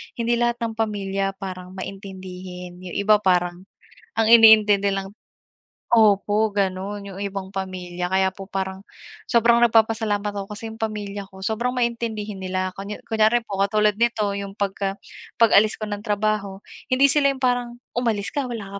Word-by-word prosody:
hindi 235 0 0
lahat 240 0 +2
ng 225 -1 -2
pamilya 195 -2 -1
parang 185 -1 -8
maintindihin, 185 -2 -8
yung 180 - -7
iba 210 +1 +4
parang, 180 -2 +1 0.5
ang 225 -1 +3
iniintindi 215 -3 +7
lang 195 0 -3 0.8
Opo 215 -1 +4
gano'n 200 +1 -2
yung 195 -1 -9
ibang 195 -1 -4
pamilya, 180 -2 -4
kaya 190 0 +3
po 195 -1 -9
parang 190 -1 -3 0.5
sobrang 235 0 +4
nagpapasalamat 220 -2 +2
ako 195 -1 -4
kasi 225 +1 -7
yung 220 - -12
pamilya 205 -2 -4
ko 190 - -14
sobrang 235 +4 -1
maintindihin 230 -4 -2
nila 185 0 -2
kun 200 +1 -5
kunyari 220 +1 +3
po 195 -3 -5
katulad 210 +1 +2
nito 230 -3 +1
yung 200 -1 -6
pagka 195 -1 -2 0.5
pag-alis 215 -1 +5
ko 215 - -4
ng 205 - -3
trabaho, 210 -2 -1 0.3
hindi 265 +2 +5
sila 290 0 +3
yung 265 - -12
parang, 245 -1 0 0.2
"umalis 225 -5 0
ka 285 -3 -2
wala 200 -5 -6
205 Hz, 155 wpm, -23 LUFS, 195-225 Hz, 0.8 s, iniintindi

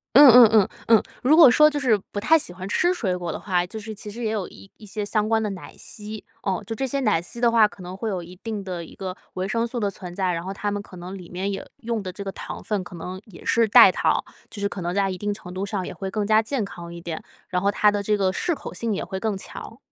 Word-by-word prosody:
嗯 285 +1 +11
嗯 245 +1 +10
嗯， 215 -4 +5 0.2
嗯， 225 -2 +6 0.2
如 270 +5 +5
果 315 -5 +9
说 305 +4 +6
就 295 -1 -2
是 245 -6 +4
不 205 - -3
太 320 +10 +5
喜 230 - -8
欢 185 +2 -7
吃 350 - +2
水 200 - -1
果 175 -2 -4
的 - - -5
话， 180 -3 0
就 220 +4 -7
是 215 +1 -7
其 210 0 -9
实 235 +4 -7
也 220 - 0
有 210 -4 -2
一 195 - -15
一 220 - -15
些 205 0 -4
相 215 0 0
关 220 0 +2
的 215 - -1
奶 190 -2 -9
昔。 215 0 -9 0.2
哦， 190 -2 -1
就 225 - -4
这 265 +4 -2
些 275 +2 -2
奶 210 -10 +2
昔 235 +7 -9
的 240 -1 +4
话， 230 -2 +6
可 200 -2 -11
能 180 +1 -7
会 220 +2 -3
有 185 -3 -3
一 175 +2 -12
定 215 -3 -4
的 180 -3 -5
一 - - -13
个 185 -1 -6 0.2
维 185 +1 -2
生 230 +2 0
素 240 0 -4
的 205 -2 0
存 180 -2 -9
在， 185 -1 0
然 165 - -3
后 190 - -4
它 205 +1 -3
们 205 0 -3
可 185 -3 -13
能 180 +2 -7
里 180 -3 -11
面 185 +3 -2
也 195 - -5
用 230 -2 -3
的 185 -2 -5
这 200 - -7
个 195 - -3
糖 - - -7
分 205 -4 -2
可 180 - -11
能 180 +3 -6
也 200 -6 -14
是 230 0 +3
代 205 - +9
糖。 - - +1 0.3
就 205 - -8
是 200 - +1
可 195 - -6
能 175 +1 -2
在 200 0 +2
一 185 - -3
定 205 +2 -2
程 195 -3 -9
度 190 +1 -2
上 200 -2 -3
也 - - -6
会 195 -1 -5
更 210 0 -1
加 215 +1 +4
健 240 +1 -2
康 170 -3 -7
一 170 - -8
点， 165 -2 -5 0.3
然 180 0 -1
后 200 - +3
它 210 +1 +4
的 205 0 -2
这 210 +1 +1
个 190 -1 +2
适 345 - 0
口 - - -8
性 230 -1 -2
也 200 - -2
会 190 - -5
更 205 -1 -2
强。 225 +4 -9
205 Hz, 320 characters per minute, -24 LUFS, 185-225 Hz, 0.3 s, 嗯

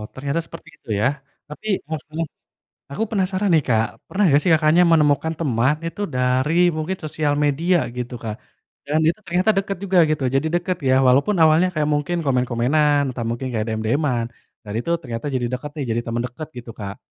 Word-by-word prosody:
ternyata 140 +4 -2
seperti 165 -1 -12
itu - - -20
ya. - - +2 0.4
Tapi 215 +8 -9 0.2
heeh 160 -1 -3 0.2
heeh, 165 - 0 0.7
aku 210 - -3
penasaran 195 -1 0
nih 155 - +4
Kak, 110 -1 +3 0.2
pernah 200 +1 +1
nggak 145 -2 +5
sih 180 - +1
Kakaknya 155 +2 +4
menemukan 155 +1 +3
teman 130 -2 +2
itu 165 - -6
dari, 125 +4 +1 0.2
mungkin 160 +5 -2
sosial 150 -1 0
media, 165 +5 +2 0.2
gitu, 125 0 -4
Kak. 110 -1 -4 0.5
Dan, 150 +2 +1
itu 175 +6 -1
ternyata 180 +5 +2
deket 195 -1 -1
juga, 190 -2 +2
gitu, 145 -3 0
jadi 140 +4 +2
deket 175 +1 0
ya, 130 - +5
walaupun 140 +11 +4
awalnya 160 +3 +5
kayak, 150 -1 +1
mungkin 150 +4 -1
komen-komenan, 130 +4 +2
entah 120 - -4
mungkin 125 +3 -3
kayak, 110 -2 -1
DM-DM-an. 120 +2 0 0.4
Dan 105 - -6
itu 145 +8 -3
ternyata 115 0 -5
jadi 120 -2 0
deket 140 +4 -4
deh, 145 - -2
jadi 115 - 0
temen 115 +1 -1
deket, 145 +5 -8
gitu 120 -1 -9
Kak? 100 -1 -6
145 Hz, 185 wpm, -21 LUFS, 125-165 Hz, 0.7 s, nggak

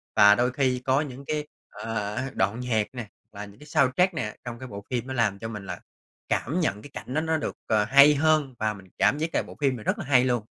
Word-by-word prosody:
Và 105 0 +7
đôi 125 +3 +1
khi 130 -1 +1
có 135 +2 +3
những 140 -2 -7
cái, 150 0 -2 0.2
ờ, 105 -2 -4
h 130 +2 -2
đoạn 100 +5 0
nhạc 115 -4 0
nè, 120 -4 -6 0.2
và 105 0 -7
những 100 0 -16
cái 150 - -14
soundtrack 155 +5 +2
nè, 105 -9 -4
trong 120 -1 -6
cái 130 - -7
bộ 100 -3 -8
phim 125 -1 -2
nó 130 - -4
làm 105 -5 +1
cho 110 - -5
mình 105 -3 -7
là - - -6 0.5
cảm 155 +9 0
nhận 105 - -1
cái 145 - -11
cảnh 125 - -7
đó 155 - +1
nó 160 0 0
được, 155 - -4
ờ, 110 -1 +3
hay 140 +5 +7
hơn 155 -2 +2
và 110 0 0
mình 95 -2 -13
cảm - - +3
giác 160 +2 -1
là - - +1
bộ - - -11
phim 135 -3 +2
này 105 - -10
rất - - 0
là - - -5
hay 130 -3 +4
luôn! 120 -4 0
125 Hz, 265 wpm, -26 LUFS, 105-145 Hz, 0.5 s, Và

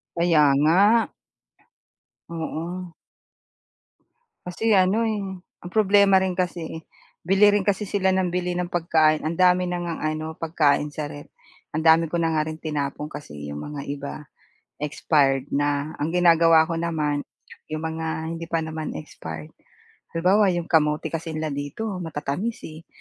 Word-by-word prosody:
Kaya 160 -5 +4
nga. 150 +4 +3 1.5
Oo. 170 +2 -5 1.5
Kasi 215 +4 +1
ano, 200 +5 +3
eh, 210 -2 -2 0.4
ang 175 - -7
problema 200 -2 +5
rin 185 -1 -1
kasi, 180 -1 -1
eh, 160 - -7 0.4
bili 195 +3 +5
rin 205 -1 +2
kasi 205 0 0
sila 190 -1 +1
ng 190 -1 +1
bili 180 0 -2
ng 175 0 -2
pagkain, 160 -3 +2
ang 160 - -1
dami 180 0 +5
na 180 0 -2
ngang 170 -1 -4
ano 155 0 -2
pagkain 150 -3 +1
sa 150 0 -4
ref, 145 0 -11 0.4
ang 155 - -1
dami 160 0 +4
ko 170 - 0
na 165 - +2
nga 155 - +2
rin 155 0 -7
tinapon 150 -1 -3
kasi 145 - -9 0.2
'yong 75 - -6 0.2
mga 145 - -5
iba, 140 0 -5 0.6
expired 145 -2 +1
na. 145 +1 0
Ang 160 +4 -2
ginagawa 165 -2 +6
ko 165 - -1
naman, 155 -4 -1 0.4
'yong 155 0 -5
mga 160 0 -3 0.2
hindi 165 0 -5
pa 165 -1 -1
naman 160 0 -5
expired, 80 0 -8 0.7
halimbawa 195 +5 +4
'yong 175 -2 -1
kamote 150 -1 +2
kasi 165 -1 -4
nila 155 -1 -2
dito 180 +8 -4
matatamis, 165 +7 -4
eh, 160 +1 -10
165 Hz, 150 wpm, -24 LUFS, 150-180 Hz, 1.5 s, ginagawa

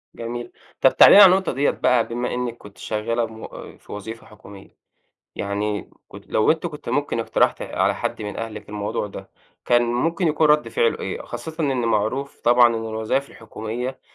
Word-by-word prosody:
جميل. 120 +1 -6 0.3
طَب 130 - +4
تعالي - - +9
لي 205 - +10
على 185 - +9
النقطة 190 -2 0
ديَّة 140 +2 +1
بقى، 125 -2 +1
بما 120 +1 -3
إنِّك 125 -1 -3
كنتِ 105 -1 -15
شغَّالة 115 +2 -2
مو 110 0 -9 0.3
في - - -16
وظيفة 110 +3 -8
حكومية، 100 -2 -15 0.6
يعني 105 +1 -3 0.2
كنتِ - - -13
لو 110 - +2
أنتِ 160 +2 0
كنتِ 150 -6 -8
ممكن 135 -1 -1
اقتَرَحتِ 115 - +1
على - - 0
حد - - -4
من 105 0 -6
أهلِك 115 -2 -7
الموضوع 105 0 -3
ده، 100 - -10 0.3
كان 120 0 +3
ممكن 160 +9 0
يكون 155 +1 +2
ردّ 150 0 +3
فعله 475 -1 +1
إيه؟ - - -5
خاصةً 160 -1 -8
إن 130 -4 0
معروف 115 +6 -1
طبعًا 120 +1 +6
إن 115 - -2
الوظايِف 110 +5 -2
الحكومية، 115 +3 -6
120 Hz, 180 wpm, -22 LUFS, 110-140 Hz, 0.6 s, لي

